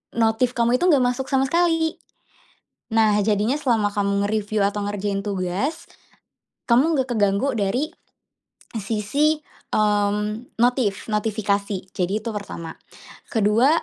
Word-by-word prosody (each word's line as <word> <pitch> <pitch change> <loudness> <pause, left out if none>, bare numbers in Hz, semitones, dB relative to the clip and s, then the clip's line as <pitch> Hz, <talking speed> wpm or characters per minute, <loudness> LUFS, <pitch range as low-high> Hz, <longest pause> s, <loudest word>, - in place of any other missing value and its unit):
notif 230 +2 +1
kamu 235 +1 +2
itu 360 - +2
gak 285 -7 +5
masuk 250 +2 -1
sama 270 -1 +2
sekali. 325 +2 +1 0.9
Nah 215 -2 +3
jadinya 210 +4 +1
selama 230 -8 0
kamu 200 0 +1
nge-review 210 -1 0
atau 205 +1 -2
ngerjain 200 -1 -2
tugas, 200 - -2 0.8
kamu 280 +7 +3
nggak 265 -1 0
keganggu 210 +5 +1
dari 230 - -1 0.8
sisi, 225 +8 0 0.4
mmm, 210 +2 0
notif 240 -4 +1
notifikasi, 205 -3 -1
jadi 195 +4 -2
itu 230 - -3
pertama. 170 -6 -6 0.6
Ke-2 225 +3 +3
215 Hz, 115 wpm, -23 LUFS, 205-255 Hz, 0.9 s, gak